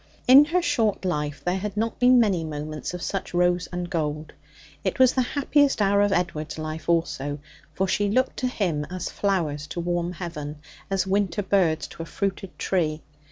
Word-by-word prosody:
In 270 +3 +9
her 350 +3 0
short 230 - +1
life 150 -5 -2
there 180 +2 0
had 210 +1 -5
not 225 +1 -1
been 250 0 +6
many 195 -7 +2
moments 155 +1 -5
of 175 - -6
such 195 -2 -3
rose 180 0 +2
and 180 0 -3
gold. 155 -3 -3 0.5
It 190 - -1
was 260 -1 +5
the 260 - +2
happiest 285 +1 +2
hour 200 0 +3
of 205 0 +3
Edward's 160 -4 -1
life 155 +1 -5
also; 145 -4 0 0.4
for 190 - +1
she 205 +2 +1
looked 255 +5 +1
to 255 - 0
him 180 - -1
as 185 0 -4
flowers 160 -7 -1
to 175 - -5
warm 175 0 -1
heaven, 155 -4 -6 0.3
as 195 -1 0
winter 200 +1 0
birds 180 -5 +2
to - - -9
a 165 - -6
fruited 195 -2 -3
tree. 155 -5 -1
180 Hz, 185 wpm, -25 LUFS, 160-205 Hz, 0.5 s, In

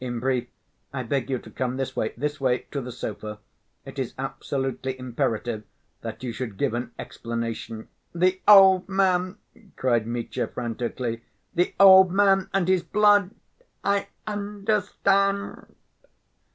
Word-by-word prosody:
in 120 -2 -3
brief, 130 0 0 0.4
I 130 -2 -4
beg 135 +3 -2
you 130 - 0
to - - -12
come 130 0 -2
this 135 -1 -3
way, 110 - -1
this 145 +2 -3
way 125 -2 +1
to 140 - -3
the 125 0 -7
sofa.... 105 -2 -6 0.5
It - - -8
is - - -3
absolutely 135 -1 -3
imperative 120 -3 -2 0.4
that - - -7
you 125 - -3
should 115 -4 -5
give - - 0
an 120 0 -3
explanation." 115 -1 -5 0.2
"The 185 +2 +1
old 195 -2 +8
man!" 185 0 +1 0.4
cried 120 -4 +1
Mitya 120 0 -3
frantically. 120 0 -4 0.3
"The 175 +1 0
old 190 -2 +9
man 195 0 +3
and 195 -3 +1
his 185 -1 +3
blood!... 205 +2 +4 0.5
I 200 0 +1 0.2
understand." 200 -1 -1
135 Hz, 140 wpm, -25 LUFS, 120-195 Hz, 0.5 s, old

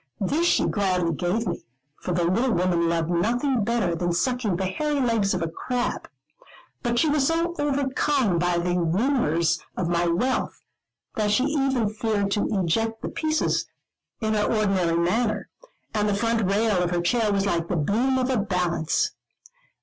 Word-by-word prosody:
This 305 - +1
she - - +3
gladly 185 -4 0
gave 180 +8 -1
me, - - -3 0.4
for - - -4
the 175 0 +1
little 225 +9 +1
woman 170 -1 +1
loved 165 0 0
nothing 240 +7 +1
better 225 -5 0
than 175 +1 -1
sucking 230 +1 0
the 190 +2 -2
hairy 295 +10 -1
legs 225 -7 +1
of 180 - -2
a - - -1
crab. 245 +9 -3 0.7
But 240 0 -1
she 315 - +3
was 290 -2 +2
so 335 +1 0
overcome 275 -7 +1
by 175 0 +1
the 175 +1 0
rumours 170 - +1 0.2
of 175 -2 -1
my 175 0 +1
wealth, 245 +10 -1 0.5
that 210 -1 0
she 210 +5 +2
even 270 -5 +1
feared 215 -2 -1
to 205 - +1
eject 225 +4 0
the - - -2
pieces 310 0 0 0.5
in 220 -1 0
her 210 -1 +1
ordinary 195 -6 +1
manner, 215 +5 0 0.4
and 210 -1 +1
the 200 - +1
front 225 -1 0
rail 205 -2 +2
of 175 - 0
her 175 -1 0
chair 220 +4 +1
was 200 -1 +1
like 170 -4 0
the 180 - -1
beam 235 - +1
of 260 0 0
a 255 - +1
balance. 180 -5 0
210 Hz, 170 wpm, -24 LUFS, 175-245 Hz, 0.7 s, she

